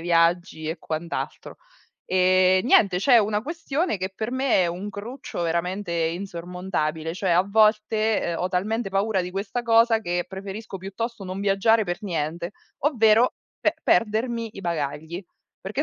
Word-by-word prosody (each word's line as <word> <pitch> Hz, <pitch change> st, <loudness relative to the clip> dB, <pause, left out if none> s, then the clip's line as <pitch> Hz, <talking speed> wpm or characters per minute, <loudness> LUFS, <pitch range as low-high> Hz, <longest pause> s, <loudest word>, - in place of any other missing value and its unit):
viaggi 170 Hz, -1 st, +1 dB
e 160 Hz, +2 st, -3 dB
quant'alto. 160 Hz, +1 st, -5 dB, 0.5 s
Ehm, 185 Hz, +1 st, +4 dB
niente, 200 Hz, -7 st, +5 dB
c'è 235 Hz, +6 st, +5 dB
una 210 Hz, -1 st, +1 dB
questione 320 Hz, -, -2 dB
che 185 Hz, -, -2 dB
per 220 Hz, +3 st, -3 dB
me 260 Hz, -6 st, +2 dB
è -, -, +2 dB
un 180 Hz, +4 st, -4 dB
cruccio 205 Hz, -1 st, -6 dB
veramente 170 Hz, +3 st, -2 dB
insormontabile, 170 Hz, -2 st, -2 dB
cioè 190 Hz, +1 st, -3 dB
a 175 Hz, +2 st, +5 dB
volte, 215 Hz, -1 st, +2 dB
uhm, -, -, -2 dB
ho 180 Hz, -, 0 dB
talmente 210 Hz, +5 st, -1 dB
paura 195 Hz, +1 st, +1 dB
di 180 Hz, 0 st, -4 dB
questa 195 Hz, +5 st, -3 dB
cosa 230 Hz, 0 st, +4 dB
che 175 Hz, -3 st, -1 dB
preferisco 195 Hz, +1 st, -7 dB
piuttosto 215 Hz, +4 st, -5 dB
non 185 Hz, 0 st, -5 dB
viaggiare 205 Hz, +3 st, +3 dB
per 175 Hz, -2 st, -3 dB
niente, 170 Hz, -1 st, -3 dB, 0.3 s
ovvero 235 Hz, -4 st, +4 dB, 0.3 s
pe -, -, +2 dB
perdermi 230 Hz, +1 st, +1 dB
i 195 Hz, -, -8 dB
bagagli. 160 Hz, +1 st, -3 dB, 0.4 s
Perché 215 Hz, +9 st, -2 dB
195 Hz, 150 wpm, -24 LUFS, 175-220 Hz, 0.5 s, niente